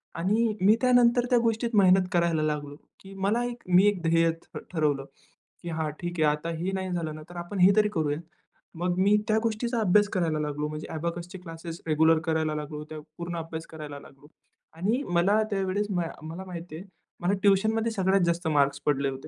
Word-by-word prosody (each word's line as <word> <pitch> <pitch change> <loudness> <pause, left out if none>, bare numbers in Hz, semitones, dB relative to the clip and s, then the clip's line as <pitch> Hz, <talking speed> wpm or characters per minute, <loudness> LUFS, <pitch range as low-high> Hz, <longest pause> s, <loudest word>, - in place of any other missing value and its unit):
आणि 210 +7 +1
मी 205 +4 +6
त्यानंतर 245 -1 +4
त्या 245 - +4
गोष्टीत 230 +1 0
मेहनत 185 0 +5
करायला 170 -2 +2
लागलो, 145 -1 -2 0.2
की 195 0 -13
मला 225 +4 +1
एक 245 0 -6
मी 185 +2 +5
एक 200 -4 +1
ध्येय 165 0 +3
ठ - - -11 0.2
ठरवलं, 145 -4 0 0.6
की 175 - -6
हा 160 -1 -2
ठीक 175 -1 -3
आहे. 150 - +5
आता 165 +2 -6
हे 180 +4 -2
नाही 190 -1 -3
झालं 165 -3 -3
ना 155 - -9
तर 175 - -12
आपण 195 +2 -5
हे 180 +2 +7
तरी 210 -1 +4
करूया. 150 -4 0 0.6
मग 180 0 0
मी 200 +2 +4
त्या 215 - +3
गोष्टीचा 230 +1 -1
अभ्यास 205 +1 +4
करायला 165 -4 0
लागलो. 150 0 -2
म्हणजे 155 0 -6
अबॅकस 170 +2 -4
चे 190 - -8
क्लासेस 165 -1 -8
रेग्युलर 160 +1 +4
करायला 160 -1 0
लागलो. 150 0 -5
त्या 155 - -7 0.2
पूर्ण 170 0 -5
अभ्यास 165 0 -6
करायला 150 -3 -8
लागलो 140 +1 -17 0.5
आणि 215 - 0
मला 195 +5 +3
त्यावेळेस 195 +1 0
म 180 -3 0 0.2
मला 165 +4 -7
माहिती 175 -3 -8
आहे, 175 +5 -8 0.4
मला 175 +3 +1
ट्युशनमध्ये 220 +3 +3
सगळ्यात 195 -2 +2
जास्त 170 0 0
मार्क्स 140 -2 +2
पडले 140 -1 +1
होते. 135 0 -8
175 Hz, 195 wpm, -27 LUFS, 155-200 Hz, 0.6 s, हे